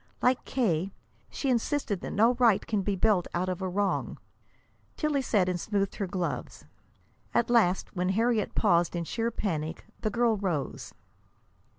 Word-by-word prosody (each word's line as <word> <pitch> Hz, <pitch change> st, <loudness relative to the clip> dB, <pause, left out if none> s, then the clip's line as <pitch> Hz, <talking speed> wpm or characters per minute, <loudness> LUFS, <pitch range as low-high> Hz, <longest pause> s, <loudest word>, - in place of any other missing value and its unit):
Like 255 Hz, 0 st, +2 dB
K., 195 Hz, -8 st, 0 dB, 0.4 s
she 275 Hz, -, -1 dB
insisted 235 Hz, -4 st, 0 dB
that -, -, -5 dB
no 225 Hz, +4 st, +4 dB
right 230 Hz, -5 st, +4 dB
can 210 Hz, -3 st, 0 dB
be 200 Hz, +1 st, -1 dB
built 195 Hz, -2 st, +2 dB
out 180 Hz, +2 st, 0 dB
of 185 Hz, 0 st, -3 dB
a 190 Hz, -, -1 dB
wrong. 200 Hz, +2 st, -1 dB, 0.8 s
Tillie 300 Hz, -3 st, +1 dB
sat 205 Hz, -7 st, +2 dB
and 180 Hz, -1 st, -1 dB
smoothed 200 Hz, 0 st, -1 dB
her 200 Hz, -, -2 dB
gloves. 180 Hz, -2 st, -4 dB, 0.7 s
At 235 Hz, -, +2 dB
last, 195 Hz, -7 st, +2 dB
when 180 Hz, 0 st, 0 dB
Harriet 225 Hz, +2 st, +1 dB
paused 170 Hz, 0 st, +3 dB
in 170 Hz, -, -1 dB
sheer 230 Hz, +7 st, -1 dB
panic, 165 Hz, -8 st, -3 dB
the 215 Hz, -, -1 dB
girl 235 Hz, 0 st, +2 dB
rose. 175 Hz, -8 st, -3 dB
200 Hz, 160 wpm, -28 LUFS, 180-230 Hz, 0.8 s, no